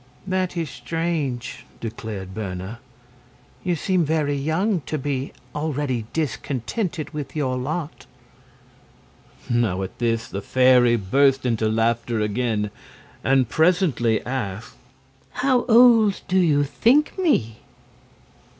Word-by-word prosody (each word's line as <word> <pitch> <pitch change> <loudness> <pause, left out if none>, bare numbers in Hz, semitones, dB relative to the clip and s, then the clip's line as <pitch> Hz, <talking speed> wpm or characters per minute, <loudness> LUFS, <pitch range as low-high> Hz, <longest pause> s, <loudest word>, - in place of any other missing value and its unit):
"That 185 -1 -1
is 160 -5 -2
strange," 140 -1 -3 0.2
declared 110 -4 -6
Berna. 95 +1 -5 0.8
"You 180 -2 0
seem 180 +2 +1
very 155 -2 0
young 165 +7 0
to 155 - -2
be 135 -1 -3 0.2
already 145 -6 -2
discontented 155 - -3
with 145 -3 -6
your 135 -4 0
lot." 150 +5 -4 1.4
Now 110 -6 +1
at 95 - -8
this 115 -1 0
the 100 - -5
fairy 125 +1 +4
burst 135 +6 +2
into 115 -3 +1
laughter 115 +1 0
again, 105 -1 -1 0.5
and 135 -2 +3
presently 160 - +2
asked: 115 -5 -4 0.6
"How 255 -2 +1
old 230 -4 +6
do 190 +1 +2
you 150 -5 +3
think 235 - +2
me?" 120 - +1
135 Hz, 110 wpm, -23 LUFS, 115-165 Hz, 1.4 s, old